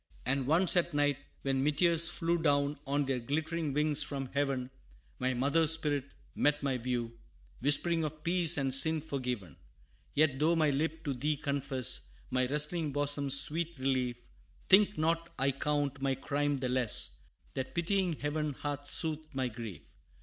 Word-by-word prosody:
And 135 +1 0
once 170 +5 +4
at 175 -4 +1
night 145 -1 +2 0.2
when 135 -1 0
meteors 165 +3 +3
flew 170 0 -1
Down 145 -2 +1
on 140 +1 +1
their 135 -2 -1
glittering 155 +4 -2
wings 150 +1 +2
from 135 -3 -4
heaven, 135 -3 -1 0.5
My 130 0 0
mother's 150 +5 +4
spirit 145 -4 -1 0.3
met 145 0 +1
my 135 -2 0
view, 120 -1 -3 0.4
Whispering 160 +5 +3
of 155 0 -5
peace 170 -2 +3
and 135 -2 0
sin 160 +4 +3
forgiven! 125 - -4 0.6
Yet, 145 -3 +3
though 160 +3 +3
my 155 -3 +3
lip 160 +3 -2
to 145 - -1
thee 145 +4 -1
confess, 135 -4 -1 0.2
My 130 -1 +1
wrestling 150 +3 +1
bosom's 140 -1 +1
sweet 170 +2 -2
relief, 130 -2 0 0.5
Think 205 +2 +6
not 165 +2 0
I 135 +1 +2
count 140 0 -1
my 135 -1 +1
crime 145 +2 -1
the 130 - -1
less, 125 -3 +1 0.4
That 130 -1 -5
pitying 180 +1 +1
Heaven 150 0 -2
hath 145 +1 -5
soothed 155 -2 -3
my 130 -2 0
grief. 110 -5 -8
145 Hz, 155 wpm, -31 LUFS, 135-160 Hz, 0.6 s, Think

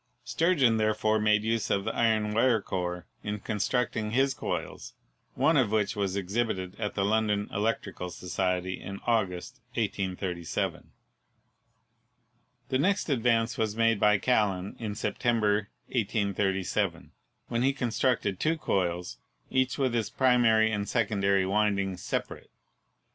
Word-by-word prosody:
Sturgeon 145 -10 +2
there 110 0 +2
fore 110 0 +1
made 105 0 +3
use 115 -1 0
of 100 0 0
the 110 - -1
iron 110 -2 +2
wire 115 +1 +3
core 90 -3 -4 0.2
in 105 0 -3
constructing 110 +1 -1
his 135 +4 +2
coils, - - -5 0.4
one 160 - +3
of 125 -7 +3
which 105 -1 +1
was 100 -2 -1
exhibited 100 -1 -2
to 105 -2 -2
the 100 - +1
London 105 -1 +1
Electrical 100 -3 -2
Society 90 +1 -2
in 100 0 -7
August, 95 -7 -1 0.2
1837. 90 -3 -2 1.8
The 130 - +1
next 195 +4 +1
advance 115 -3 +1
was 110 -2 0
made 115 -1 +2
by 105 0 +5
Callan 100 -5 0
in 105 -3 -4
September, 105 -4 0 0.2
J 120 -4 +1
^37, 100 -2 -1 0.4
when 115 0 0
he 135 +2 +3
constructed 120 -6 0
two 165 +1 +1
coils, 90 - -1 0.3
each 130 0 +1
with 130 -4 +1
its 115 -2 0
pri 130 -2 +3
mary 110 -2 +4
and 105 -1 -2
secondary 100 -4 +1
windings 100 -2 0
separate. - - -4
105 Hz, 135 wpm, -28 LUFS, 100-115 Hz, 1.8 s, by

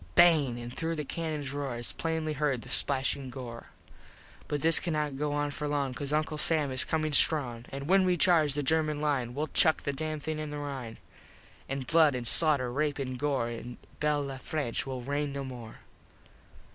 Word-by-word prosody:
Bang! 150 -8 +4
And 120 0 -8
through 165 0 -3
the 150 -2 -5
cannons 150 -3 -5
roar 140 -3 -4
Is 120 - -5
plainly 160 -1 -3
herd 140 -4 -2
the 125 - -12
splashin 135 0 0
gore. 120 -2 -9
IV - - -25
But 145 -1 -3
this 165 0 +4
cannot 150 -5 -3
go 150 +2 -3
on 145 0 -2
for 150 +1 -5
long, 140 -3 -2
Cause 140 +2 -5
Uncle 155 0 -2
Sam 150 -3 +1
is 130 - +4
comin 155 -1 -2
strong. 125 -7 +4
An 140 0 -7
when 190 +4 +3
we 180 -1 +1
charge 155 -5 +3
the 145 - -2
German 155 +1 0
line 135 -5 -2
We'll 150 +2 -3
chuck 160 -2 +4
the 140 - -3
dam 155 +2 -5
thing 155 +1 -5
in 155 -1 -5
the 150 - -6
Rine. 135 -6 -7 0.7
An 135 0 -4
blood 155 0 +2
an 125 -1 -5
slauter, 140 -3 +8
rape 145 +1 -2
an 130 -2 -5
gore 135 -4 -2
In 120 +1 -9 0.2
Bel 150 -1 -1
Le 135 -1 -7
France 135 -3 -3
will 130 -2 -5
rain 145 +3 -3
no 140 0 -5
more. 120 -4 -10
145 Hz, 200 wpm, -28 LUFS, 130-155 Hz, 0.7 s, slauter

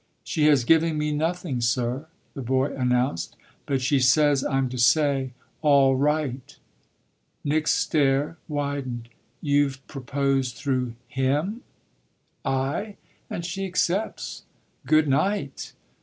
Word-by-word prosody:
"She 150 -3 +1
has 145 -5 +5
given 160 +3 +3
me 150 0 0
nothing, 160 -3 -1
sir," 120 +4 0 0.3
the 140 - -6
boy 130 +2 0
announced; 125 -8 0 0.3
"but 135 -2 0
she 135 +2 +3
says 140 +2 +4
I'm 135 -1 +1
to 125 - -6
say 135 0 +3 0.3
'All 140 -3 +5
right!'" 140 -2 -1 0.9
Nick's 150 +2 +1
stare 145 +1 +1
widened. 140 -5 -3 0.3
"You've 140 -3 +1
proposed 135 -1 -1
through 130 -4 -2
him?" 140 - -1 0.8
"Aye, 140 +11 -2 0.3
and 170 - -4
she 190 +2 -3
accepts. 185 +3 -1 0.5
Good 155 -1 +4
night!" 195 +9 -1
140 Hz, 110 wpm, -25 LUFS, 130-155 Hz, 0.9 s, has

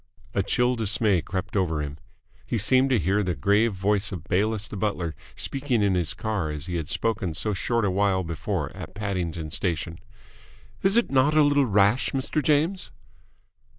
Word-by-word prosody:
A - - +1
chill 125 +5 +1
dismay 105 -4 +2
crept 95 +3 -5
over 85 -6 0
him. 75 0 -5 0.4
He 120 - -2
seemed 130 +6 +4
to 130 - +3
hear 100 +3 +1
the 90 -3 -1
grave 105 +2 +2
voice 100 +2 +1
of 95 - -6
Bayliss 105 +3 0
the - - -8
butler 95 -5 -2 0.2
speaking 135 -5 0
in 100 -2 +2
his 90 -3 0
car 105 -8 -2
as 75 -1 -4
he 90 -1 -3
had 80 -4 -4
spoken 100 -7 -1
so 105 +5 0
short 115 +3 0
a 95 - +1
while 95 -1 +1
before 80 -2 -3
at - - -9
Paddington 90 -6 -3
Station. 85 -1 -2 0.8
"Is 195 +3 +2
it 235 - +2
not 140 +3 +3
a 155 - +7
little 145 -2 +3
rash, 105 +3 +2
Mr. 135 +3 -1
James?" 155 +7 +1
100 Hz, 180 wpm, -25 LUFS, 90-120 Hz, 0.8 s, a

